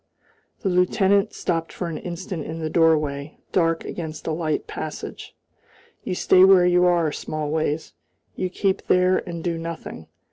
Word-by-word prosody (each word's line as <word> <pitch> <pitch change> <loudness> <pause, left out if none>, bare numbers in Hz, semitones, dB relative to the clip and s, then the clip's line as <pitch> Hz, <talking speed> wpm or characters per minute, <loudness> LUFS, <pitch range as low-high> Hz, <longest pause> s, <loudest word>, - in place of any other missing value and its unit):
The 195 - 0
lieutenant 190 +2 +3
stopped 165 -2 -2
for 175 - -4
an 165 - -4
instant 175 -2 -5
in 160 +2 -6
the 160 -1 -3
doorway, 155 -3 +1
dark 165 -2 +1
against 160 -3 -6
the 160 - -2
light 155 -2 -1
passage. - - -7 0.7
"You 185 - -3
stay 185 +1 +5
where 190 -2 +7
you 180 0 +4
are, 170 -3 +3
Smallways. 155 +1 -2 0.4
You 185 - -2
keep 190 +1 -1
there 185 0 +4
and 170 -1 -5
do 170 -2 -2
nothing. 165 - -7
170 Hz, 150 wpm, -23 LUFS, 160-180 Hz, 0.7 s, where